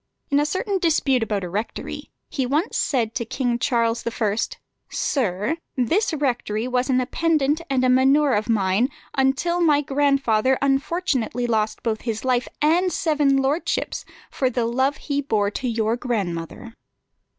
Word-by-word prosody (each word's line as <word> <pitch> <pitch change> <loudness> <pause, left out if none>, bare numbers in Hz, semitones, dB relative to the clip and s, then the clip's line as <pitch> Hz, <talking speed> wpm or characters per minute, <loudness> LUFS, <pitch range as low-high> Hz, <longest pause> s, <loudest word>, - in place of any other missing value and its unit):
In 280 - +4
a 295 - +1
certain 380 +5 -1
dispute 295 -7 +2
about 210 -3 -1
a - - -3
rectory, 205 +6 -5 0.2
he 265 -3 -2
once 300 - 0
said 230 -5 0
to 235 - -2
King 240 +1 -1
Charles 230 -1 +1
I.: 220 -3 0 0.5
"Sir, 215 - -1 0.2
this 345 - +1
rectory 245 -6 -1
was 255 +1 0
an 255 -1 +3
appendant 305 +2 +1
and 260 -2 +1
a - - +4
manour 265 +2 +4
of 210 +3 0
mine 205 +3 +2 0.2
until 270 +7 +1
my 300 -4 +4
grandfather 270 -4 +2
unfortunately 270 -3 0
lost 220 -2 -1
both 220 -2 -1
his 225 0 -4
life 250 -1 +1 0.2
and 350 +4 +3
seven 295 -5 +2
lordships, 275 +5 -1 0.3
for 260 - 0
the 240 -1 -1
love 260 +5 +1
he 285 -1 -2
bore 210 -7 0
to 255 - -3
your 225 -1 0
grandmother." 205 -2 -4
255 Hz, 150 wpm, -23 LUFS, 230-285 Hz, 0.5 s, In